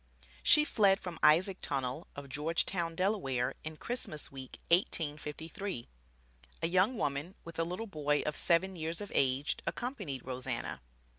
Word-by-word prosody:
She 300 -1 +6
fled 200 -8 +4
from 175 -3 -6
Isaac 180 +5 +5
Tonnell 130 +4 -2
of 140 -1 -7
Georgetown, 165 +4 0
Delaware, 135 - +1
in 155 0 -6
Christmas 195 - -2
week, 130 -1 -8
1853. 160 - 0 0.8
A - - +4
young 185 +8 +3
woman 145 +5 -1
with 170 0 -7
a - - +4
little 180 +7 -3
boy 150 -7 0
of 150 - -1
seven 185 +3 +2
years 165 0 -3
of 205 - -6
age 135 +2 +2
accompanied 200 - -3
Rose 130 0 -5
Anna. 65 - -3
165 Hz, 145 wpm, -33 LUFS, 145-190 Hz, 0.8 s, She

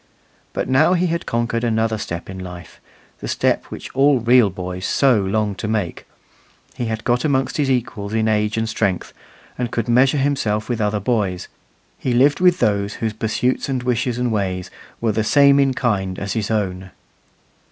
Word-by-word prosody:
But - - -2
now 130 +7 +4
he 180 0 +2
had 170 -1 -2
conquered 115 0 -1
another 110 -1 0
step 85 -3 -5
in 95 0 -7
life 90 -2 -10 0.4
the - - -6
step - - 0
which - - -9
all 140 +1 +4
real 120 -1 +5
boys 90 0 -6
so 130 -5 +3
long 105 +2 0
to 100 +3 -5
make: 105 -5 -3 0.7
he 120 - -4
had 110 -1 -3
got 120 0 +1
amongst 135 -3 0
his 145 -3 +1
equals 110 -5 -2
in 110 0 +1
age 105 0 +1
and 110 0 0
strength, 100 -5 -1 0.5
and 120 -1 -1
could 115 0 -2
measure 130 +4 +4
himself 135 -7 0
with 120 -3 -2
other 105 0 0
boys; 100 -5 -1 0.5
he 125 - -1
lived 140 +4 +4
with 180 -1 +4
those 100 - 0
whose 110 -2 -2
pursuits 110 +5 -1
and 130 -2 -1
wishes 125 -1 0
and 125 -1 0
ways 95 -3 -2 0.3
were 115 -1 +1
the 110 +1 0
same 140 +4 +5
in 135 -2 +2
kind 95 -7 -1
as 100 -1 -3
his 110 -3 -2
own. 95 -4 -2
110 Hz, 185 wpm, -20 LUFS, 100-125 Hz, 0.7 s, real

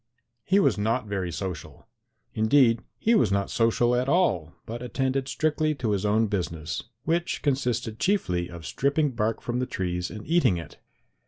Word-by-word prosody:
He 190 - +3
was 190 - +2
not 115 +3 0
very 95 -4 -3
social. 90 -3 -6 0.5
Indeed, 115 +1 +4 0.2
he 230 - +2
was 120 - +3
not 100 0 0
social 120 +1 +2
at 125 +2 0
all, 95 - +2
but 115 +2 -6
attended 130 +2 -1
strictly 155 +1 0
to 115 -6 -1
his 100 0 0
own 110 +2 +3
business, 85 -6 -3 0.2
which 170 +3 -1
consisted 125 -5 -1
chiefly 90 - 0
of 85 -2 -9
stripping 140 - +1
bark 115 -2 -1
from 120 +1 -2
the 125 - -1
trees 90 -5 -2
and 110 -1 -8
eating 165 - +3
it. 85 - -9
115 Hz, 165 wpm, -26 LUFS, 100-135 Hz, 0.5 s, Indeed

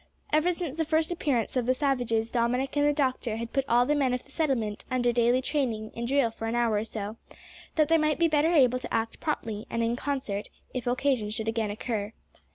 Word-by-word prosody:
Ever 310 +4 +4
since 335 -5 -4
the 325 - 0
first 315 +1 +1
appearance 275 -10 0
of 245 -2 0
the 255 - +3
savages 245 -5 0
Dominick 250 +3 0
and 290 0 +3
the - - +4
doctor 260 -6 -1
had 230 0 -5
put 270 -1 +1
all 240 +1 +5
the 295 - +2
men 270 -4 +2
of 250 - -5
the - - -18
settlement 240 -10 -1
under 245 -1 +2
daily 240 +2 +3
training 245 -7 -1
in 235 - -4
drill 270 -3 +2
for 225 0 -5
an 225 - -1
hour 235 -2 +2
or 210 - -1
so, 215 0 -5 0.6
that 310 -2 +4
they 330 0 +4
might 305 -1 +2
be 335 - +4
better 310 +1 +3
able 255 -6 +4
to - - -8
act 225 0 -1
promptly 225 -9 -3
and 230 - -1
in 230 +1 +1
concert 250 -7 -3 0.2
if 250 -2 -4
occasion 255 -3 +1
should 220 +1 -3
again 225 -1 0
occur. 210 0 -3
250 Hz, 225 wpm, -28 LUFS, 225-290 Hz, 0.6 s, all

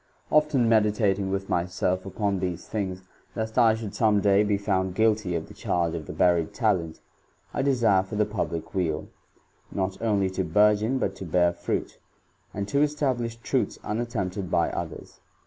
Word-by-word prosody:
;.0iit6n 150 -5 +3
meditating 105 -3 +2
with 95 0 -2
myself 90 +2 -1
upon 100 0 -1
these 90 -2 -4
thio^V'^^^t 100 +3 -5
I 115 -3 +5
should 110 -3 -6
some 105 -3 +3
day 100 0 +4
be 105 -1 +1
found 95 -2 -1
guilty 110 -4 +2
Tj/ 85 -2 -3
the - - -12
charge 85 -2 -1
of 80 -3 -5
the - - -5
buried 85 -3 +2
talent,^ 95 -9 0 0.5
I - - 0
desire 120 -8 +3
fof.iJ^ 105 +2 -2
public 85 -5 -3
weal, 80 -5 -1 0.6
not 95 -1 -3
only 100 -4 +1
to 95 - -1
burgeon, 105 +7 +3
but 100 -7 -1
to 95 - -7
bearfruit,^ 85 +1 0 0.5
and 100 -1 -4
to 140 - +2
establish 130 -6 0
truths 125 +2 -1
unat 115 +3 -2
temp<ed 95 -5 -3
Iby 85 -1 +1
others. - - -6
100 Hz, 160 wpm, -26 LUFS, 90-110 Hz, 0.6 s, I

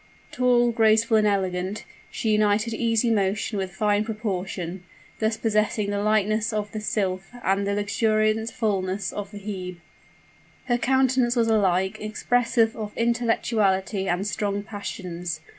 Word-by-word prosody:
Tall, 245 -1 +3
graceful, 225 0 +4
and 215 -1 +3
elegant, 190 0 -1 0.2
she 220 - -1
united 215 +2 +2
easy 230 0 +1
motion 205 +1 0
with 190 -1 -4
fine 210 0 +2
proportion; 190 -5 -4 0.4
thus 220 0 0
possessing 215 -2 0
the 200 0 -1
lightness 215 +1 +1
of 210 -1 -3
the 215 - -4
Sylph 195 -3 -2
and 195 +1 +1
the 200 - 0
luxuriant 215 +1 +1
fullness 195 -4 -1
of 205 -1 -5
the 205 - -10
Hebe. 190 -3 -6 0.9
Her 245 -1 +1
countenance 260 -1 +2
was 230 -2 +2
alike 190 -1 +2
expressive 230 +1 +1
of 210 -2 -6
intellectuality 220 -4 +1
and 180 +3 0
strong 205 -1 -2
passions. 180 -5 -5
210 Hz, 135 wpm, -25 LUFS, 195-225 Hz, 0.9 s, graceful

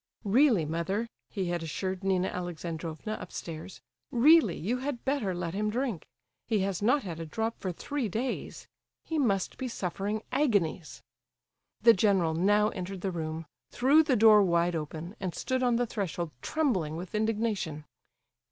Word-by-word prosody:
"Really, 220 - +4
mother," 170 +8 -1 0.2
he 190 -4 -2
had 175 -1 -1
assured 185 +4 -3
Nina 190 -1 +2
Alexandrovna 170 +2 -5
upstairs, 165 +2 -7 0.3
"really 265 - +5
you 220 +10 -1
had 265 -2 -4
better 265 -10 0
let 170 -1 -3
him 210 +2 0
drink. 235 - -2 0.4
He 225 - +2
has 195 -1 -1
not 250 +7 +3
had 170 -4 -6
a 165 - -4
drop 225 +7 -2
for 185 - -2
three 255 - -3
days; 240 +7 -4 0.4
he 320 -2 -1
must 200 -9 0
be 260 - -2
suffering 205 0 -3
agonies—" 200 - 0 0.8
The 230 0 +9
general 190 -5 +2
now 205 +5 +3
entered 185 0 -6
the 195 - -1
room, 160 -1 -4 0.2
threw 275 +6 +5
the 285 -5 +2
door 215 -2 +7
wide 170 -2 +2
open, 160 +4 -5
and 185 -3 -3
stood 260 -1 -1
on 245 -2 +3
the 245 +1 +2
threshold 175 -7 -3
trembling 185 - 0
with 180 +1 -7
indignation. 215 -8 -1
195 Hz, 155 wpm, -29 LUFS, 170-230 Hz, 0.8 s, The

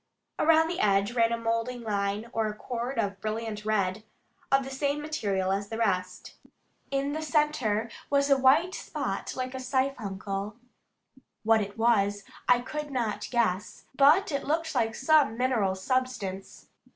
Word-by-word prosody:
Around 320 0 +5
the 340 - -3
edge 200 +1 +2
ran 230 -1 +3
a 235 - 0
moulding 230 +1 -2
line 205 0 -1
or 220 -1 0
cord 245 +3 -4
of 200 -3 -1
brilliant 215 -1 -4
red, 210 -1 0 0.5
of 270 0 +4
the 270 - -7
same 285 +2 -1
material 205 -12 -1
as 200 +1 -2
the 225 - -4
rest. 185 -5 -1 0.6
In 275 +1 -1
the 310 - -3
centre 295 -9 +1 0.2
was 280 0 +3
a 280 - +5
white 280 +8 +4
spot - - -4
like 255 0 -3
a 260 - -5
siphuncle. 210 -6 -2 0.9
What 225 0 +4
it 200 +1 -6
was 205 -3 +2 0.3
I 245 -1 +5
could 300 +4 -5
not 225 -6 -2
guess, 210 -5 -1
but 300 +8 +5
it 280 - -1
looked 320 +2 -1
like 230 -3 0
some 280 -5 +3
mineral 230 -7 +1
substance. 200 -3 -3
230 Hz, 150 wpm, -28 LUFS, 205-275 Hz, 0.9 s, Around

